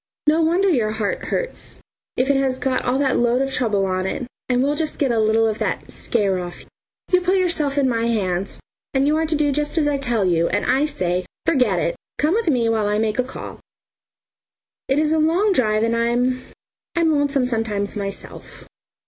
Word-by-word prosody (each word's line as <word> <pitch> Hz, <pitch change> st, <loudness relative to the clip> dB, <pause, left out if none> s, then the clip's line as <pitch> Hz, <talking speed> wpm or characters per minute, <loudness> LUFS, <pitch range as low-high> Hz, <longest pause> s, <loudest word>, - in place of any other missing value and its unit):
"No 310 Hz, +2 st, +4 dB
wonder 345 Hz, +5 st, +2 dB
your 235 Hz, -, +1 dB
heart 215 Hz, -2 st, -2 dB
hurts -, -, -3 dB, 0.4 s
if 255 Hz, -, +2 dB
it 280 Hz, -, +3 dB
has 270 Hz, -1 st, +1 dB
got 260 Hz, 0 st, -1 dB
all 250 Hz, +1 st, +1 dB
that 270 Hz, -2 st, +1 dB
load 240 Hz, +1 st, +2 dB
of 270 Hz, 0 st, -1 dB
trouble 210 Hz, -6 st, +1 dB
on 185 Hz, 0 st, -1 dB
it, 250 Hz, -, -3 dB, 0.2 s
and 250 Hz, 0 st, +2 dB
we'll 285 Hz, +2 st, +1 dB
just 310 Hz, 0 st, -2 dB
get 275 Hz, -4 st, +1 dB
a 230 Hz, -, +1 dB
little 220 Hz, +1 st, +3 dB
of 220 Hz, -1 st, -1 dB
that -, -, -3 dB
'scare' 200 Hz, -6 st, 0 dB
off. 175 Hz, -1 st, -7 dB, 0.5 s
You 365 Hz, 0 st, +4 dB
put 365 Hz, +2 st, +2 dB
yourself 315 Hz, -6 st, 0 dB
in 275 Hz, -2 st, +3 dB
my 230 Hz, -2 st, 0 dB
hands, 195 Hz, -5 st, -1 dB, 0.4 s
and 270 Hz, +1 st, +3 dB
you 300 Hz, +2 st, +3 dB
are 320 Hz, 0 st, 0 dB
to 310 Hz, -, 0 dB
do 290 Hz, -1 st, +2 dB
just 295 Hz, +3 st, -2 dB
as 300 Hz, -2 st, +3 dB
I 285 Hz, -1 st, 0 dB
tell 235 Hz, -7 st, 0 dB
you, 170 Hz, -2 st, +2 dB
and 205 Hz, -, 0 dB
I 280 Hz, +3 st, +2 dB
say 180 Hz, -, -1 dB, 0.2 s
forget 250 Hz, -, +2 dB
it! 170 Hz, 0 st, 0 dB, 0.2 s
Come 305 Hz, +3 st, +2 dB
with 450 Hz, -2 st, 0 dB
me 245 Hz, -5 st, +2 dB
while 220 Hz, -2 st, +1 dB
I 210 Hz, 0 st, +1 dB
make 220 Hz, +1 st, 0 dB
a -, -, +4 dB
call. 255 Hz, -, -8 dB, 1.3 s
It 270 Hz, -, +1 dB
is 305 Hz, +1 st, +2 dB
a 320 Hz, -, +2 dB
long 350 Hz, +7 st, +3 dB
drive 215 Hz, -7 st, +2 dB
and 230 Hz, 0 st, +1 dB
I'm 245 Hz, +2 st, +1 dB, 0.5 s
I'm 335 Hz, -2 st, +3 dB
lonesome 285 Hz, -3 st, +1 dB
sometimes 220 Hz, -4 st, -2 dB
myself." 200 Hz, -1 st, -7 dB
255 Hz, 210 wpm, -21 LUFS, 215-295 Hz, 1.3 s, No